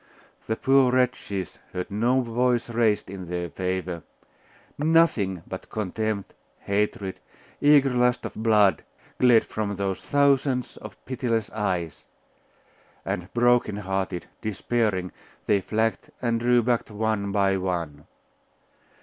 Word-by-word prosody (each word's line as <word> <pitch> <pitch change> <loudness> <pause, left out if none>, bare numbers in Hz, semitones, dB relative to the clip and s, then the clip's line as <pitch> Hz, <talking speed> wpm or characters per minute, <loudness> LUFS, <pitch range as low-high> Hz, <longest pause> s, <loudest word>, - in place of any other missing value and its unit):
The 110 - 0
poor 135 +1 +4
wretches 125 -7 -1
heard 90 +2 -4
no 120 +6 +2
voice 120 0 0
raised 115 -3 +1
in 95 -2 -8
their 90 -1 -3
favour: 90 -2 -3 0.7
nothing 145 - +2
but 95 - -8
contempt, 110 0 -3 0.3
hatred, 100 -1 -1 0.4
eager 145 -2 +5
lust 125 0 +2
of - - -5
blood, 110 -3 +3 0.4
glared 120 -3 +5
from 105 -2 -3
those 95 -1 -2
thousands 140 -2 +1
of - - -10
pitiless 120 -5 -1
eyes; 90 -7 -2 1.0
and, 90 +3 -4
broken 120 -3 +3
hearted, 95 -3 -3 0.2
despairing, 105 -3 -1 0.3
they 100 -2 +2
flagged 110 +3 -1
and 115 -2 0
drew 120 0 +3
back 120 -1 0
one 105 -1 -1
by 100 -1 +2
one. 85 -6 -3
110 Hz, 115 wpm, -25 LUFS, 95-120 Hz, 1.0 s, eager